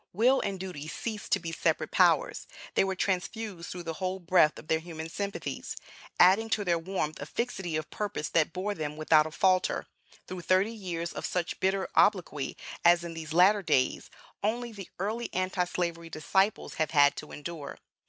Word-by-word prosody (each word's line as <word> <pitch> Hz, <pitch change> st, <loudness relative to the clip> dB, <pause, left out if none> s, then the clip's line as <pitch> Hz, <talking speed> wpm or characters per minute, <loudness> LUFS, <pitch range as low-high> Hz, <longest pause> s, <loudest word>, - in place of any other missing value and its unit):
Will 245 Hz, +8 st, +4 dB
and 195 Hz, -2 st, -3 dB
Duty 175 Hz, -6 st, -6 dB
ceased 215 Hz, +6 st, -5 dB
to -, -, +4 dB
be 165 Hz, -1 st, -5 dB
separate -, -, 0 dB
powers; -, -, +3 dB, 0.3 s
they -, -, +4 dB
were 190 Hz, 0 st, -1 dB
transfused 190 Hz, 0 st, -2 dB
through 180 Hz, -1 st, -6 dB
the 165 Hz, -1 st, -4 dB
whole 185 Hz, +1 st, -1 dB
breadth 175 Hz, -3 st, +4 dB
of -, -, -11 dB
their 160 Hz, 0 st, +2 dB
human 160 Hz, -1 st, -7 dB
sympathies, 200 Hz, +3 st, -4 dB, 0.4 s
adding 195 Hz, +5 st, +6 dB
to 210 Hz, -2 st, 0 dB
their 170 Hz, -2 st, +2 dB
warmth 165 Hz, -3 st, -3 dB
a -, -, -5 dB
fixity 190 Hz, -9 st, -3 dB
of 155 Hz, 0 st, -3 dB
purpose 205 Hz, -7 st, -3 dB
that 165 Hz, -1 st, +2 dB
bore 190 Hz, +4 st, -2 dB
them 150 Hz, -4 st, -4 dB
without 155 Hz, 0 st, +4 dB
a -, -, -8 dB
falter, 185 Hz, +2 st, +2 dB, 0.4 s
through 185 Hz, -1 st, -6 dB
thirty 185 Hz, +5 st, +2 dB
years 175 Hz, -6 st, -4 dB
of -, -, -6 dB
such 180 Hz, -2 st, -2 dB
bitter 190 Hz, 0 st, +1 dB
obloquy, 180 Hz, -9 st, +2 dB, 0.3 s
as, 175 Hz, 0 st, +6 dB
in 170 Hz, -1 st, -5 dB
these 160 Hz, -1 st, -7 dB
latter 190 Hz, +5 st, +5 dB
days, 130 Hz, -8 st, +1 dB, 0.3 s
only 235 Hz, +3 st, -1 dB
the 200 Hz, -4 st, -9 dB
early 220 Hz, +5 st, -2 dB
Anti 185 Hz, 0 st, 0 dB
Slavery 170 Hz, -2 st, -3 dB
disciples 190 Hz, +7 st, 0 dB
have 155 Hz, -, +2 dB
had 145 Hz, -2 st, +5 dB
to 150 Hz, -, -8 dB
endure. 150 Hz, -1 st, -7 dB
180 Hz, 185 wpm, -29 LUFS, 165-200 Hz, 0.4 s, adding